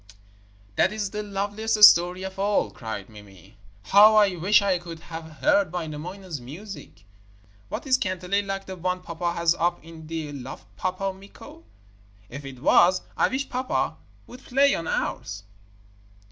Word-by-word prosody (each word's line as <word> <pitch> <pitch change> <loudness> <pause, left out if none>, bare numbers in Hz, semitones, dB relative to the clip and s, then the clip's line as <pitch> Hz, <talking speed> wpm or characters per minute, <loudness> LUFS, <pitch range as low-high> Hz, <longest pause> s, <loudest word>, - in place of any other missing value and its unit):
'That - - +3
is 210 -2 -3
the 210 - -3
loveliest 210 +2 -1
story 180 -1 +7
of 190 0 -7
all,' 205 +1 +1
cried 110 -4 -7
Mimi. 100 -2 -16 0.3
'How 210 +2 +7
I 205 -3 +4
wish 190 +5 +4
I 190 -3 +1
could 170 -2 -9
have 160 -1 -10
heard 200 -5 +3
Wainamoinen's 170 0 -6
music! 165 - -10 0.6
Was - - -4
his 260 -2 +2
kantele 185 +1 -1
like 195 0 -4
the 190 - -7
one 180 +1 -3
pappa 170 0 -3
has 170 -1 +2
up 175 0 -1
in 160 -1 -12
the 160 -2 -5
loft, 130 -9 -8
Pappa 185 - -2
Mikko? 195 - -14 0.7
If 140 0 -8
it 130 -1 -10
was, 180 +3 +5
I - - +3
wish 270 +1 -3
pappa 255 +1 -1 0.3
would 250 +2 -13
play 275 +2 +3
on 165 - -3
ours.' 100 +1 -3
180 Hz, 155 wpm, -25 LUFS, 160-200 Hz, 0.7 s, story